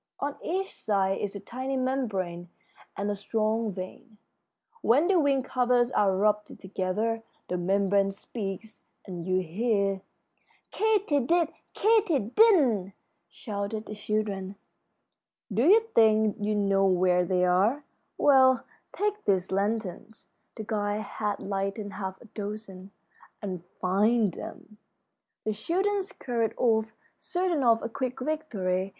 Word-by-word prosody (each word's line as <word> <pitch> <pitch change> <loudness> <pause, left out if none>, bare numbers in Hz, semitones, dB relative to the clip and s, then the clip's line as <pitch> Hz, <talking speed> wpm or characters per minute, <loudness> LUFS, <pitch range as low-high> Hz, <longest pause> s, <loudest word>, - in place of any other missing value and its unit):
On 285 0 -2
each 380 +3 -2
side 195 -2 0
is 205 0 -3
a - - -4
tiny 260 +6 -4
membrane 200 -10 -2 0.5
and 205 +1 -1
a - - -2
strong 215 +2 -1
vein. 195 +4 -9 0.6
When 280 +9 +4
the 380 -2 +4
wing 275 -3 +2
covers 250 -1 +2
are 195 -5 +2
rubbed 210 +1 0
together 200 +4 -2 0.3
the 180 - -1
membrane 195 +2 +2
speaks, 200 +1 -6 0.2
and 180 -3 -6
you 185 0 +2
hear 200 +2 0 0.3
" - - -38
"Katy 415 -9 +2
did, 330 +5 +2 0.3
Katy 430 -7 +3
didn't!" 250 - +3 0.4
shouted 210 0 -5
the - - -7
children. 205 -2 -2 1.0
"Do 235 +9 +3
you 430 +5 +7
think 220 -2 +4
you 210 +1 0
know 195 -1 +3
where 180 -1 +3
they 180 0 +1
are? 200 +11 +2 0.3
Well, 260 -3 +5 0.3
take 415 +1 -1
these 190 -2 +1
lanterns" 210 +1 -3 0.2
the 220 - -6
guide 210 -1 -1
had 210 -1 -3
lighted 195 +1 -3
half 190 -1 -5
a - - -14
dozen 205 -3 -7 0.5
"and 185 -4 -5 0.2
find 205 +2 +2
them." 210 +4 -10 0.6
The 215 - -1
children 385 - 0
scurried 240 - -3
off, 220 -2 +2 0.3
certain 355 -5 -1
of 230 -2 +4
a - - -1
quick 255 +2 -3
victory. 205 -11 -1
215 Hz, 130 wpm, -28 LUFS, 195-255 Hz, 1.0 s, you